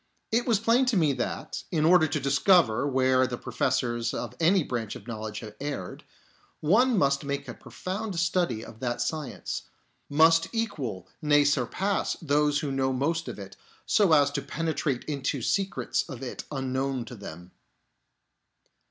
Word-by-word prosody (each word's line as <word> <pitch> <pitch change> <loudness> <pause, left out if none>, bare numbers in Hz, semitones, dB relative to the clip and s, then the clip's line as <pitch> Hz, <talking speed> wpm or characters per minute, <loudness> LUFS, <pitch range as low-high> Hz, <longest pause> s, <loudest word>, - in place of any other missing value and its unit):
It 235 +3 +1
was 225 -4 +3
plain 235 +4 +3
to 240 -5 +2
me 155 -5 +3
that, - - -4
in 155 -3 +1
order 170 -1 +6
to 150 - -1
discover 140 - +3
where 130 -1 +3
the 125 - -4
professors 120 -3 -1
of - - -4
any 175 +2 +4
branch 115 -6 -4
of 100 - -10
knowledge 110 -2 -5
have 110 -2 -9
erred, 140 -10 -5 0.6
one 225 +9 +3
must 140 -3 +2
make 140 0 -3
a - - -5
profound 190 -1 -5
study 170 -10 0
of 110 -1 -12
that 120 -1 -2
science; 135 +2 -4 0.4
must 165 +3 +5
equal, 140 - -3
Bay 145 -1 +4
surpass, 145 - 0
those 150 -2 +2
who 145 -3 -2
know 135 0 0
most 160 +5 -1
of - - -6
it, 100 -1 -9 0.3
so 200 -5 +3
as 145 -2 +5
to 145 - -2
penetrate 150 -2 -2
into 140 -2 -2
secrets 195 - 0
of 130 -3 -7
it 125 - -6
unknown 130 -2 -2
to 120 - -10
them. 90 -5 -10
140 Hz, 160 wpm, -27 LUFS, 125-165 Hz, 0.6 s, order